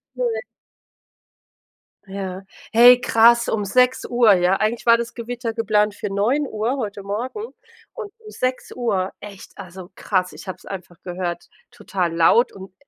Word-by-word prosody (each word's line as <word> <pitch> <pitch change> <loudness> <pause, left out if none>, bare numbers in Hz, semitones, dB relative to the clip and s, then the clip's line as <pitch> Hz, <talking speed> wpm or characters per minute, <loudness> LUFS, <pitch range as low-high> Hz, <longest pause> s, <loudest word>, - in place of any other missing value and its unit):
Nein. 480 -2 -1 1.7
Ja, 190 -1 -6 0.3
hey 245 +2 +8
krass, 235 0 +4
um 210 -2 -1
6:00, 245 0 +3
ja, 180 0 +2
eigentlich 225 +2 -2
war 230 0 +7
das 235 0 -5
Gewitter 235 -1 -5
geplant 210 -2 +1
für 205 - -5
9:00 235 +3 -1
heute 205 -4 -5
Morgen 255 - -5 0.4
und 430 -4 -8
um 435 -1 -14
6:00, 240 -6 -2
echt, 200 -2 -11
also 185 0 -11
krass, 185 -2 -1
ich - - -12
habe 185 - -5
es - - -20
einfach 180 -3 -9
gehört, 175 -1 -5 0.2
total 180 -4 -3
laut 200 +9 +4
und 190 -1 -12
215 Hz, 140 wpm, -21 LUFS, 190-245 Hz, 1.7 s, hey